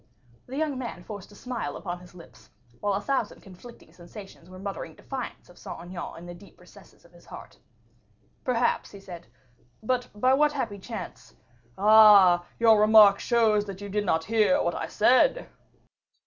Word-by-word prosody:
The 260 +2 -7
young 300 -4 -2
man 235 -8 -7
forced 205 +1 -10
a - - -16
smile 235 - -6
upon 175 0 -6
his 180 0 -17
lips, 170 - -16 0.3
while 205 -1 -1
a 200 - -3
thousand 270 -6 -3
conflicting 195 +6 -15
sensations 180 0 -13
were 185 - -12
muttering 195 -4 -7
defiance 260 -2 -8
of 175 - -19
Saint - - -9
Aignan 175 0 -8
in 170 - -11
the 175 - -9
deep 180 +3 -17
recesses - - -19
of - - -21
his - - -20
heart. - - -12 0.8
"Perhaps," 245 -1 0
he 200 - -13
said. 180 -3 -11 0.6
"But 250 +2 -2
by 255 +5 +2
what 295 +2 +2
happy 230 -8 -4
chance - - -9 0.2
" 120 0 -35
"Ah! 205 -4 +6
your 225 -2 +4
remark 210 -2 +6
shows 220 -3 +1
that 195 -2 -8
you 205 0 -8
did 210 +1 -1
not 160 -4 0
hear 225 - +2
what - - -1
I - - -5
said." - - +2
205 Hz, 175 wpm, -26 LUFS, 180-235 Hz, 0.8 s, Ah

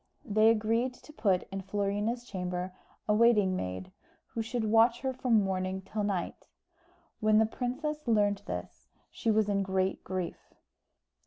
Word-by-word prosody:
They 215 -1 +4
agreed 230 +3 +1
to 305 - -15
put 190 -9 +1
in 195 0 -3
Florina's 205 +4 -1
chamber 180 -3 -4 0.3
a 210 - +3
waiting 210 -4 +4
maid, 95 - -4 0.4
who 230 - -3
should 225 +1 -2
watch 225 +2 +4
her 265 -1 -1
from 240 -4 +2
morning 190 0 -2
till 210 +2 -3
night. 195 -4 -3 0.7
When 215 0 +4
the 220 - +5
princess 265 +6 -3
learnt 205 -2 +2
this - - -6 0.2
she 230 - -2
was 215 -1 +3
in 200 -1 +1
great 190 0 0
grief. 185 -2 -5
210 Hz, 150 wpm, -30 LUFS, 190-230 Hz, 0.7 s, the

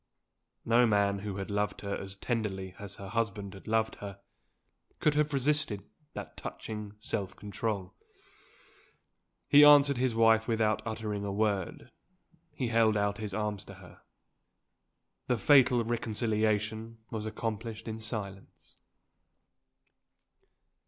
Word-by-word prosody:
No 120 +1 +5
man 100 -2 +2
who 100 -1 -5
had 100 +1 -5
loved 105 0 -1
her 100 -1 -3
as 95 0 -6
tenderly 100 -4 -3
as 100 -1 -7
her 100 -1 -9
husband 105 -3 -2
had 95 - -13
loved 110 0 +1
her, 100 -1 -8 0.8
could 150 - +3
have 150 0 +1
resisted 140 -7 +1 0.3
that - - -7
touching 105 -2 -6
self 100 -2 -3
control. 100 -2 -4 1.5
He 145 0 +8
answered 145 -2 +7
his 125 -2 +1
wife 115 0 +4
without 110 -2 +1
uttering 105 -2 -3
a 100 - -2
word 100 -3 -1 0.6
he 125 -3 -3
held 115 -2 +3
out 100 0 0
his 105 -3 -4
arms 105 -2 -2
to 100 - -11
her. 90 -1 -15 1.3
The 125 - +2
fatal 130 -2 +5
reconciliation 110 -1 -1
was 110 -1 -3
accomplished 110 0 -4
in 110 0 -4
silence. 105 -3 -7
110 Hz, 125 wpm, -30 LUFS, 100-115 Hz, 1.5 s, He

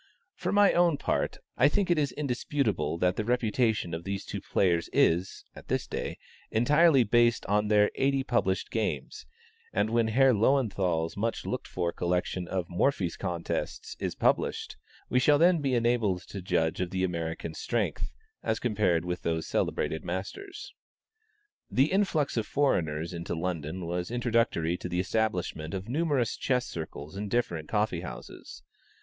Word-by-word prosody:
For - - -3
my 205 0 +5
own 170 -3 +3
part, - - -1 0.2
I - - +6
think 190 +3 +1
it 170 - +3
is 140 -3 +1
indisputable 130 - -1
that 90 +2 +1
the 110 - 0
reputation 110 -5 +1
of 80 +1 -4
these 100 +1 -4
two - - -5
players 85 -3 +1
is, 90 +3 +2
at - - -12
this - - 0
day, - - -4 0.3
entirely 145 +4 +5
based 120 +1 +3
on 105 +1 +1
their 105 -1 +4
eighty 135 0 +1
published 105 -7 0
games, - - -3 0.4
and 110 - 0
when 115 -1 +2
Herr 130 +4 +4
Löwenthal's 100 -9 +1
much 110 +3 -2
looked - - -3
for 85 -1 -2
collection 90 0 -1
of 90 -2 -2
Morphy's 90 -1 0
contests 90 -3 -4
is - - -3
published, - - 0 0.3
we 125 - +2
shall 145 +3 +5
then 170 +1 +4
be 135 -3 +1
enabled 115 -6 +1
to 100 - -6
judge 80 -2 0
of 90 - -1
the 95 0 -1
American's 85 -2 -3
strength, - - -1 0.3
as 110 - 0
compared 100 -8 +1
with 90 0 -3
those 80 -1 -1
celebrated 80 - -1
masters. 95 - -6 1.0
The 135 +4 +2
influx 180 -9 +1
of 110 - 0
foreigners 85 - 0
into 85 0 -4
London 85 0 -3
was 90 +1 -3
introductory 115 -8 +1
to 90 - -6
the 90 - -1
establishment 90 -5 -1
of 95 +1 -5
numerous 140 -3 0
chess 125 -2 0
circles 80 -2 -7
in 100 +1 -4
different 85 -9 -1
coffee 105 -5 0
houses. 65 -4 -9
105 Hz, 155 wpm, -29 LUFS, 90-125 Hz, 1.0 s, I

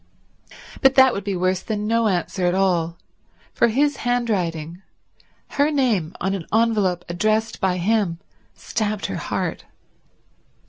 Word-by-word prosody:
But 270 -1 +5
that 265 -2 +6
would 200 - -4
be 200 -1 -2
worse 185 +1 0
than 210 0 -3
no 230 +1 +2
answer 180 -1 -1
at 175 - +1
all; 175 -3 +1 0.6
for 235 - +3
his 280 +5 +1
handwriting, 185 -9 -1 0.7
her 285 +1 +2
name 235 - 0
on 190 +2 -1
an 185 -4 -5
envelope 210 -6 +1
addressed 215 +6 0
by 185 -2 +1
him, 195 -2 +1 0.4
stabbed 215 -3 -3
her - - -3
heart. - - -3
205 Hz, 135 wpm, -22 LUFS, 180-230 Hz, 0.7 s, that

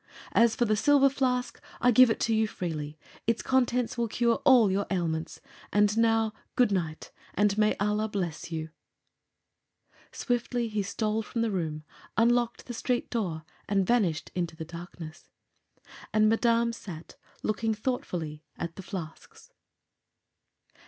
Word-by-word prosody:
As 230 -1 +4
for 240 - +2
the 215 -1 +2
silver 275 +3 +4
flask, 250 -2 -1 0.2
I 250 - +4
give 255 +1 +7
it 225 - 0
to 230 - +2
you 220 0 +2
freely. 155 -6 -5 0.3
Its 230 -1 +1
contents 250 -2 +1
will 235 - +1
cure 235 +3 +1
all 245 -8 +6
your 200 +1 0
ailments. 165 -4 -2 0.3
And 210 0 +3
now, 225 -1 +2 0.2
good 245 -4 +4
night, 165 -5 -2 0.2
and 205 0 +3
may 215 0 +3
Allah 210 +2 0
bless 175 -5 -4
you!" 160 -1 -4 1.4
Swiftly 245 -1 -1
he 210 -1 -1
stole 215 +2 -1
from 230 +1 -2
the 225 - 0
room, 160 -5 -3 0.3
unlocked 240 +1 +2
the 245 - -6
street 245 +1 -1
door 175 -9 -2 0.2
and 195 -2 +2
vanished 190 -9 +1
into 170 -2 -2
the 160 0 -6
darkness. 170 -1 -10 0.8
And 215 0 +4
Madame 230 +1 +2
sat 170 -8 -9 0.3
looking 220 +1 0
thoughtfully 175 - -3
at 170 -1 -5
the - - -5
flasks. 190 - -9
215 Hz, 145 wpm, -28 LUFS, 175-235 Hz, 1.4 s, give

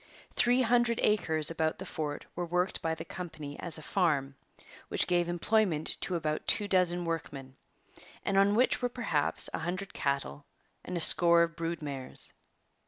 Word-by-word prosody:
Three 245 +2 +3
hundred 240 -1 +2
acres 160 -7 +2
about 160 -1 -1
the 190 - -8
fort 155 -5 -5
were 175 - -3
worked 180 +2 -1
by 165 0 -1
the 160 +1 -8
company 160 -5 -8
as 170 -3 -3
a 155 - -10
farm, 150 -8 0 0.5
which - - 0
gave 175 -1 +1
employment 175 -2 0
to 185 - -1
about 155 -2 -3
two 205 - +4
dozen 180 -2 +1
workmen, 140 -5 -5 0.7
and 195 - 0
on 200 +1 +4
which 250 +2 +2
were 245 - 0
perhaps 205 - +1
a - - -2
hundred 185 +4 -4
cattle 140 +1 -3 0.4
and 180 - -5
a - - -1
score 170 +1 +6
of 165 0 -3
brood 165 -1 -4
mares. 135 -3 +1
170 Hz, 170 wpm, -30 LUFS, 155-195 Hz, 0.7 s, score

